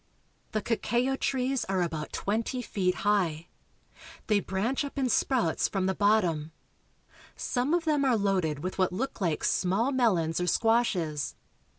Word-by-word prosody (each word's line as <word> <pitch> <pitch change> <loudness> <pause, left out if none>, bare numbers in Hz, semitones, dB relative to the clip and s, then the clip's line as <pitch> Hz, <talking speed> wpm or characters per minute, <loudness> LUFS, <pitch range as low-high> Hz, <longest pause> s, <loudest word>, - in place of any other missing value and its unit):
The 215 -1 -1
cacao 240 +3 0
trees 265 -1 0
are 190 -2 0
about 160 -3 -4
twenty 230 +5 -2
feet 185 -5 0
high. 175 -6 +1 0.8
They 210 -2 +3
branch 215 +9 -1
up 285 0 -7
in 265 -2 +1
sprouts 235 -8 +1
from 190 -2 -1
the 190 - +1
bottom. 180 -7 +1 0.8
Some 260 +6 0
of 345 -1 -1
them 300 -3 +2
are 255 -4 +3
loaded 185 -7 0
with 185 +1 -4
what 185 -2 +2
look 230 +5 -4
like 165 -5 0
small 195 +9 +1
melons 180 - +1
or 180 - -1
squashes. 180 - +1
205 Hz, 150 wpm, -28 LUFS, 180-250 Hz, 0.8 s, They